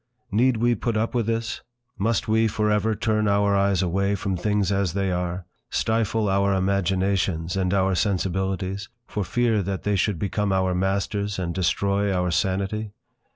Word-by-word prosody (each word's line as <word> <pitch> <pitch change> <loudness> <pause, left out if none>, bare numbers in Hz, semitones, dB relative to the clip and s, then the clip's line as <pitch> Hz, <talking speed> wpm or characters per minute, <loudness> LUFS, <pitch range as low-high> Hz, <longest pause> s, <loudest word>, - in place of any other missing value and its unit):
Need 120 +4 +3
we 120 +2 +3
put 115 0 -1
up 115 +3 -1
with 120 -3 0
this, 115 0 -2 0.3
must 110 +2 0
we 110 +1 +3
for 105 0 0
ever 105 +1 +1
turn 110 0 0
our 100 0 +3
eyes 100 -2 +2
away 100 +3 +1
from 100 -1 -2
things 100 +1 0
as 100 -4 0
they 95 -1 0
are, 90 0 -2 0.2
stifle 110 -1 0
our 100 0 +2
imaginations 95 -2 0
and 95 -2 0
our 95 -1 +2
sensibilities, 95 0 -1 0.2
for 105 - -3
fear 115 +2 +1
that 95 0 -3
they 105 0 +1
should 100 0 +1
become 100 +3 -1
our 95 -1 +1
masters, 100 +2 -1
and 85 -2 -2
destroy 100 +2 +1
our 90 -1 0
sanity? 100 +4 -1
100 Hz, 165 wpm, -24 LUFS, 95-105 Hz, 0.3 s, Need